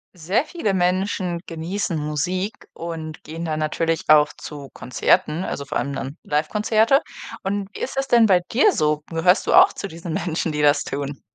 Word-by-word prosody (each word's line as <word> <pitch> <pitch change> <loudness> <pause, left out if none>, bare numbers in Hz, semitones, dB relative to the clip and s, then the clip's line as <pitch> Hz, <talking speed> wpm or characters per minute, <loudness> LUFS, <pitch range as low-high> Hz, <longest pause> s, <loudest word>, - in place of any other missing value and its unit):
Sehr 185 - 0
viele 305 - -2
Menschen 180 -1 0
genießen 170 +2 -3
Musik 165 +7 -2 0.2
und 160 -2 -7
gehen 165 +2 -7
da 155 -2 -2
natürlich 160 +1 -1
auch 150 -1 +6
zu 145 -3 -9
Konzerten, 150 +6 +1
also 140 -6 -4
vor - - -2
allem 140 - -2
dann 135 +2 -5
Livekonzerte. 215 - +2 0.4
Und 200 0 -2
wie - - -7
ist 265 - -4
das 270 - 0
denn 235 -3 +5
bei 190 -4 +5
dir 295 - +5
so? 150 - 0
Gehörst 170 +3 +3
du - - +2
auch - - +7
zu - - -5
diesen 170 -1 -7
Menschen, 170 -2 -2
die 150 - -1
das 145 0 +4
tun? 140 0 -5
165 Hz, 180 wpm, -22 LUFS, 150-195 Hz, 0.4 s, auch